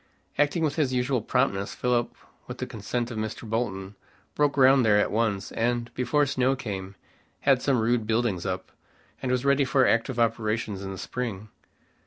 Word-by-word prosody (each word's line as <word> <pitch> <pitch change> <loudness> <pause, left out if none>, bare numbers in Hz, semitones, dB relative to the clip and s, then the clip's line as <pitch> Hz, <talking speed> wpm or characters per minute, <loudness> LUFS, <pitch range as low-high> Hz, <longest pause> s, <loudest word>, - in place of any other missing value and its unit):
Acting 145 +3 +2
with 150 -1 0
his 140 -5 +1
usual 125 0 +1
promptness, 105 -4 0
Philip, 125 -1 0 0.3
with - - -7
the - - -3
consent 120 -1 -3
of 110 - -4
Mr. 110 +1 -5
Bolton, 100 -4 -2 0.4
broke 145 -1 +2
ground 135 -1 +5
there 105 -2 +4
at 105 - +2
once, 105 -3 0
and, 120 +1 -1
before 130 +4 +1
snow 130 -1 +1
came, 100 -6 -6 0.5
had 135 -3 +3
some 135 -1 +2
rude 115 -1 +1
buildings 110 -5 0
up, 95 -1 -4 0.5
and 130 - -1
was 125 +1 0
ready 140 0 +4
for 135 -1 +3
active 115 +2 +1
operations 110 -3 0
in 95 0 -5
the 95 - -6
spring. 110 -2 -5
120 Hz, 175 wpm, -26 LUFS, 105-130 Hz, 0.5 s, ground